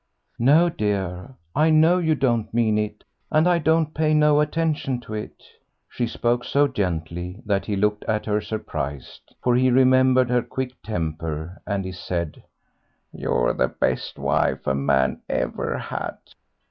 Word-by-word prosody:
"No, 150 +8 +5
dear, 100 - -3 0.2
I 155 +1 +4
know 160 +3 +5
you 160 -3 +2
don't 120 -6 0
mean 110 -2 +2
it, 105 0 -4 0.3
and 155 +2 +3
I 175 -1 +3
don't 160 0 +2
pay 155 -1 +2
no 150 -1 +4
attention 150 -4 0
to 110 - -9
it." 105 0 -7 0.4
She 120 - -2
spoke 120 +1 0
so 145 +3 +2
gently 90 - -3
that 100 -2 0
he 105 - -1
looked 105 +1 0
at 105 -1 -1
her 105 0 0
surprised, 75 - -6
for 125 -1 +3
he 130 +1 +4
remembered 130 0 +4
her 125 0 +3
quick 130 +1 -4
temper, 80 -3 -4
and 100 -2 -1
he 95 - -4
said, 85 -3 -4 0.7
"You're - - 0
the 65 - +1
best - - -2
wife - - 0
a 65 - +1
man 65 -1 +1
ever - - -2
had." - - -5
115 Hz, 155 wpm, -23 LUFS, 90-145 Hz, 0.7 s, No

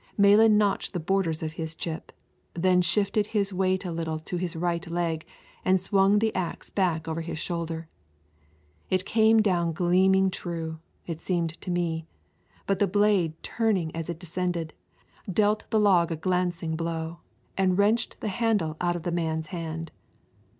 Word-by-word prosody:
Malan 210 +2 +6
notched 205 -1 +1
the 180 - -1
borders 165 -2 0
of 155 0 -3
his 160 0 -5
chip, 160 0 -5 0.4
then 180 +1 +3
shifted 200 +4 +1
his 205 -2 0
weight 185 0 +1
a 175 - -3
little 165 -1 -2
to 160 +3 -5
his 175 -1 -3
right 170 +1 -2
leg 165 -2 -2 0.4
and 190 0 +3
swung 195 +2 +3
the 220 +1 +1
axe 180 -3 -4
back 170 -5 0
over 160 +1 -2
his 165 -1 -5
shoulder. 165 -1 -4 1.0
It 185 0 +1
came 220 +1 +4
down 170 -5 +1
gleaming 190 +3 +3
true, 165 -3 -5 0.3
it 165 -2 -5
seemed 170 -3 0
to 190 - -6
me, 165 -2 -1 0.6
but 195 -1 0
the 205 - +3
blade, 200 -4 +2
turning 195 -9 0
as 165 0 -4
it 170 - -3
descended, 175 -2 -3 0.6
dealt 210 +3 +1
the 220 - +2
log 180 -5 +4
a - - 0
glancing 175 -1 -1
blow 165 0 -3 0.4
and 185 -1 +2
wrenched 210 +3 +2
the 215 - -1
handle 195 -7 0
out 175 0 +1
of 170 - -5
the 175 - -2
man's 160 -2 -1
hand. 165 -1 -5
175 Hz, 165 wpm, -27 LUFS, 165-195 Hz, 1.0 s, Malan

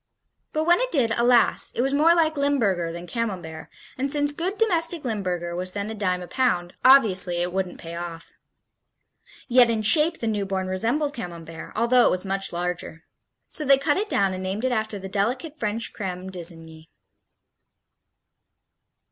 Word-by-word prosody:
But 310 - -1
when 345 +2 +4
it - - -1
did, 245 -7 +2
alas, 240 +1 +3
it 240 - +1
was 270 +1 0
more 320 +4 +5
like 320 -2 +2
Limburger 225 - 0
than 170 +1 -7
Camembert, 180 -8 -5 0.3
and 275 +1 -1
since 290 0 +1
good 365 +6 -3
domestic 340 -7 +1
Limburger 180 -6 -3
was 185 +1 -2
then 205 +1 -4
a - - -4
dime 185 -4 -1
a - - -9
pound, 180 -6 0
obviously 210 -9 +5
it 175 +1 -2
wouldn't 190 -1 -3
pay 165 0 -8
off. 170 -1 -8 1.1
Yet 245 -1 +5
in 220 -2 0
shape 315 +9 +4
the - - -3
newborn 195 -3 -1
resembled 235 +11 -1
Camembert, 165 -7 -8
although 235 +2 +4
it - - +4
was 185 +1 -2
much 195 0 -1
larger. 175 -2 -4 0.5
So 310 - -1
they 275 -1 +5
cut 290 +2 +1
it 415 +2 -1
down 195 -1 +1
and 185 - -5
named 195 +6 -3
it 260 - +1
after 220 -3 -2
the 195 0 -7
delicate 245 - -2
French 225 -3 -3
Creme 185 -2 -5
d'lsigny. 165 -3 -5
210 Hz, 170 wpm, -24 LUFS, 180-275 Hz, 1.1 s, more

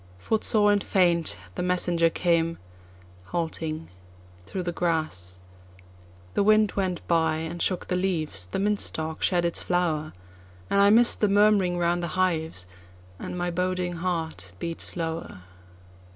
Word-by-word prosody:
Footsore 210 - +4
and 205 -1 +1
faint, 175 - +1 0.2
the - - -4
messenger 175 -2 +2
came 165 -1 0 0.7
halting 160 - -4 0.6
through 185 - -4
the 175 - -2
grass. 155 - -2 1.0
The - - +1
wind 215 +1 +4
went 185 -3 -2
by 160 -2 +2
and 165 +2 -5
shook 185 -2 0
the 180 - -2
leaves—the 155 - -2
mint 205 +1 0
stalk 160 0 -2
shed 175 -2 +1
its 170 - -1
flower—And 95 - -3
I 200 - +6
miss'd 235 +3 +6
the 210 - +3
murmuring 200 -3 +3
round 175 0 +1
the 170 - -2
hives, 160 - 0 0.5
and - - -6
my 175 0 -2
boding 180 0 -2
heart 160 - -4
beat 165 - -5
slower. 165 - -4
175 Hz, 135 wpm, -26 LUFS, 160-185 Hz, 1.0 s, I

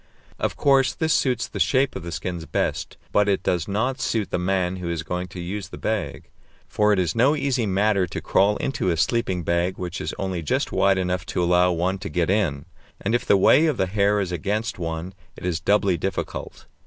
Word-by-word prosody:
Of - - -1
course 135 -2 +3
this 160 -1 +1
suits 125 -3 +1
the - - -7
shape 135 0 +2
of - - -4
the 85 0 -7
skins 85 0 -4
best, - - -2
but 105 0 +3
it 100 - +1
does 90 -3 0
not 125 +7 -1
suit 110 -5 -1
the - - 0
man 90 0 0
who 90 -2 -4
is 85 -1 -2
going 90 +2 -3
to 90 +1 -9
use 95 +4 -4
the - - -9
bag. 110 -4 -3 0.4
For 105 0 +2
it 105 - +3
is 90 -3 +1
no 130 +6 +3
easy 135 -6 0
matter 100 -1 +2
to - - -5
crawl 100 +2 +2
into 135 -8 -1
a 85 - 0
sleeping 95 -3 0
bag 85 +3 0
which 90 0 -5
is - - -4
only 95 -3 -2
just 75 - -1
wide 95 -1 +3
enough 90 -1 -1
to 90 - -1
allow 90 +1 +4
one 90 +3 -1
to 100 +1 -5
get 90 0 0
in, 80 -10 0 0.3
and 105 - -2
if 120 - 0
the 100 - +5
way 150 +11 +5
of 155 - 0
the 95 - +2
hair 100 +2 +2
is 95 -3 -2
against 100 +6 -2
one 85 +2 -4 0.2
it - - -8
is 85 -3 0
doubly 95 0 +2
difficult. 95 +3 -4
95 Hz, 220 wpm, -23 LUFS, 90-105 Hz, 0.4 s, the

